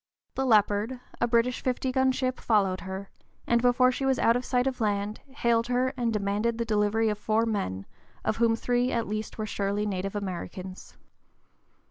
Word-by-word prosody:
The 265 0 -1
Leopard, 215 +2 +2 0.2
a 235 - +2
British 235 +1 +1
fifty 255 0 -1
gun 260 0 +3
ship, 255 0 -2
followed 195 -4 +1
her, 190 +1 -6 0.3
and 235 0 +2
before 250 +1 +4
she 265 - -4
was 265 -1 +2
out 230 - +4
of 245 - -1
sight 250 0 +1
of 260 -3 -2
land, 205 0 -1
hailed 235 -4 +1
her 250 +1 +1
and 240 -3 0
demanded 210 +2 0
the 235 - -1
delivery 215 0 +2
of 210 -1 -2
four 220 +2 +1
men, 100 - -2 0.4
of 215 - 0
whom 230 0 +3
three 245 +2 0
at 230 -1 0
least 215 +1 -4
were 215 - -2
surely 205 0 -1
native 195 0 -3
Americans. 185 -1 -6
225 Hz, 180 wpm, -27 LUFS, 205-245 Hz, 0.4 s, before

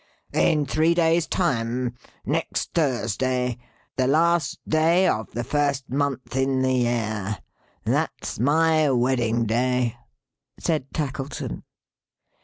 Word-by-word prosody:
"In 155 -3 +3
three 160 +4 +2
days' 165 -1 +3
time. 125 -6 -1 0.3
Next - - -2
Thursday. 125 - 0 0.4
The 130 -1 +2
last 165 +2 +2
day 165 +4 +3
of 110 -9 0
the 120 - -2
first 140 -1 -1
month 135 -3 -2
in 135 0 +1
the 130 0 +2
year. 110 -5 -1 0.5
That's - - -1
my 155 +3 +3
wedding 120 -2 +1
day," 125 +1 +1 0.6
said 150 -5 -1
Tackleton. 135 - -4
130 Hz, 105 wpm, -24 LUFS, 120-155 Hz, 0.6 s, In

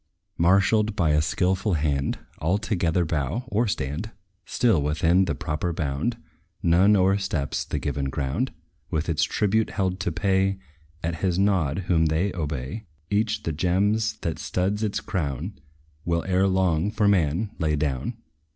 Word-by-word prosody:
Marshalled 100 +5 +3
by 85 -7 +2
a 75 0 +3
skilful 95 +4 +1
hand, 70 -3 0 0.2
All 85 +7 +1
together 90 -5 0
bow, 80 - -1
or 115 +2 +1
stand 80 +3 -3 0.4
Still, 115 -11 +2
within 80 +6 +3
the 85 -5 -1
proper 75 +3 -2
bound: 80 - -2 0.5
None 90 +5 +5
o'ersteps 95 -6 +1
the - - -3
given 70 -1 -2
ground, 70 - -1 0.4
With 80 0 -1
its 80 -3 +1
tribute 110 +1 +1
held 95 -2 -1
to 90 -2 -1
pay, 95 +2 +1 0.5
At 80 0 -2
his 90 +1 0
nod 95 -4 +1
whom 80 -3 +3
they 85 +6 0
obey, 75 - -4 0.3
Each 105 +1 +1
the 80 - -1
gems, 100 +7 +1
that 80 -3 -3
stud 95 +3 -1
its 105 -2 -1
crown, 70 -8 -3 0.4
Will 85 -1 0
ere 95 +1 +2
long, 95 -1 +2
for 105 -1 +1
man, 95 +1 +2
lay 80 -3 +1
down. 75 - -2
90 Hz, 150 wpm, -25 LUFS, 75-100 Hz, 0.5 s, None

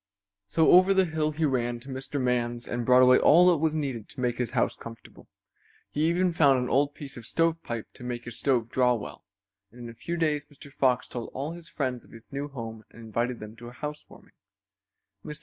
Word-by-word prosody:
So 160 +9 +3
over 185 +2 +6
the 190 -1 +4
hill 160 -2 -1
he 155 +1 -1
ran 120 -4 0
to 135 - -9
Mr. 135 +2 -4
Man's 120 -1 -1
and 120 -1 -3
brought 125 0 +7
away 125 0 +6
all 175 +4 +6
that 170 - +2
was 155 +1 0
needed 135 -8 -3
to - - -9
make 125 -1 -1
his 125 - -1
house - - 0
comfortable. 115 -1 -12 0.6
He 150 +2 0
even 180 +1 +1
found 140 -5 +5
an 125 0 -2
old 145 +2 +2
piece 140 -3 -8
of 115 -2 -9
stovepipe 165 -9 -1
to - - -11
make 120 -1 -5
his 120 -1 -5
stove 120 -5 +1
draw 125 -1 +3
well, 75 -10 -8 0.4
and 120 - -17
in 120 - -7
a - - -9
few 170 +9 -5
days 150 -3 0
Mr. 140 -1 -15
Fox 130 -3 +1
told 120 -2 -6
all 140 +4 -3
his 170 0 -10
friends 130 -4 -3
of - - -20
his 115 0 -15
new 140 +1 -3
home 115 -5 -8
and - - -16
invited 115 +2 -2
them 105 +1 -9
to 120 +1 -10
a 120 - -10
housewarming. 150 +3 -9 0.9
Mr. 150 -1 -6
130 Hz, 220 wpm, -27 LUFS, 120-150 Hz, 0.9 s, brought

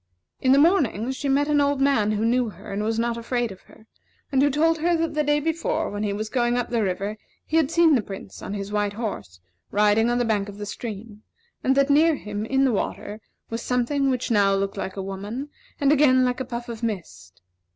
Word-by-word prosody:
In 260 - +3
the 270 - +6
morning, 280 - +3
she 275 +1 -3
met 285 +2 +2
an 295 -1 +3
old 285 -1 +1
man 270 -7 +2
who 215 +1 0
knew 240 0 +2
her, 195 +1 -10
and 200 - -2
was 225 +1 -1
not 235 0 0
afraid 240 -1 -2
of 190 - -12
her, 220 - -18 0.5
and 270 -1 +3
who 285 - +4
told 320 +3 +2
her 340 +2 +2
that 325 -1 -1
the 300 0 +1
day 295 0 +2
before, 325 +2 -1
when 205 0 -4
he 210 -1 -1
was 215 +4 -5
up 240 0 +1
the 235 -2 +1
river, 200 +2 -2 0.3
he 320 - 0
had 315 -4 +3
seen 335 -1 +4
the 255 - +3
Prince 195 -1 -9
on 200 - -5
his 200 0 -5
white 205 -1 0
horse, 105 - -5 0.3
riding 210 +2 +3
on 240 - +1
the 245 - +1
bank 210 -3 0
of 200 - -10
the 205 - -5
stream; 210 0 -7 0.4
and 265 - +3
that 275 +1 +3
near 315 +2 +5
him, 210 -3 -5
in 270 +2 +2
the 260 - +3
water, 210 0 -3 0.3
was 230 0 -3
something 265 +3 0
which 255 -1 -1
now 200 -2 +4
looked 195 0 -2
like 190 - -5
a 195 - -3
woman, 205 +9 -5 0.3
and 280 0 +3
again 260 -4 +5
like 250 0 -1
a 260 - -3
puff 240 -1 -6
of 230 -2 -7
mist. 185 - -5
235 Hz, 235 wpm, -24 LUFS, 205-275 Hz, 0.5 s, the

